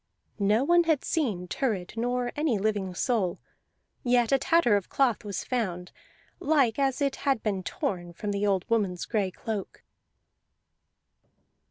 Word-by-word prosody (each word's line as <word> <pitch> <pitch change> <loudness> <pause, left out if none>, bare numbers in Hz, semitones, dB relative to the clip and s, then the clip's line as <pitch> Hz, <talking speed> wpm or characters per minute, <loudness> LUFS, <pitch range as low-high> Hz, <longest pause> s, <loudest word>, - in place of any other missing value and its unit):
No 210 +4 +3
one 345 +3 +4
had 315 -4 +1
seen 210 - -1
Thurid 195 -4 -2
nor 245 +1 -1
any 295 -7 +1
living 200 -3 -1
soul; 200 -5 0 0.7
yet 245 -2 +3
a 270 - +4
tatter 275 -6 +3
of 200 - -2
cloth 245 -4 +1
was 200 -3 -4
found, 185 -8 -3 0.5
like 275 -6 +2
as 275 0 +1
it 275 -1 0
had 275 -5 0
been 200 -3 -1
torn 175 -1 -3
from 205 +5 -4
the 200 +1 0
old 190 -2 +1
woman's 200 -6 0
gray 205 -5 0
cloak. 205 +2 -6
225 Hz, 145 wpm, -27 LUFS, 195-265 Hz, 0.7 s, one